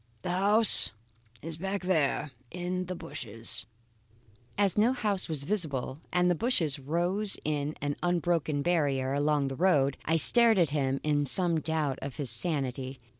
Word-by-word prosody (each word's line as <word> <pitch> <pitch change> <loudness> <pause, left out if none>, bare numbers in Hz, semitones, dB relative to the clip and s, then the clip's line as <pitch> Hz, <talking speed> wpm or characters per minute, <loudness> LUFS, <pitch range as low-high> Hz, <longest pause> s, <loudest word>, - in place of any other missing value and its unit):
The - - -3
house 205 +4 +6 0.5
is 165 0 -5
back 195 +2 -4
there 155 -5 0 0.2
in 180 +2 -4
the 185 - -5
bushes." 115 -7 -3 0.9
As 200 -3 +2
no 225 +5 +3
house 205 -8 -1
was 150 -3 -1
visible 145 -7 -3
and 180 0 +2
the 180 - +3
bushes 165 - 0
rose 175 +8 -1
in 150 0 -2
an 145 0 -2
unbroken 170 -4 0
barrier 140 -6 0
along 145 0 +1
the 135 - -5
road, 145 -5 +2
I 165 - +1
stared 230 +5 +5
at 170 -5 +2
him 135 -2 -1
in 145 -1 0
some 170 +2 +2
doubt 155 -4 -2
of 135 -2 -6
his 135 -5 -2
sanity. 135 -2 -1
155 Hz, 155 wpm, -28 LUFS, 140-180 Hz, 0.9 s, house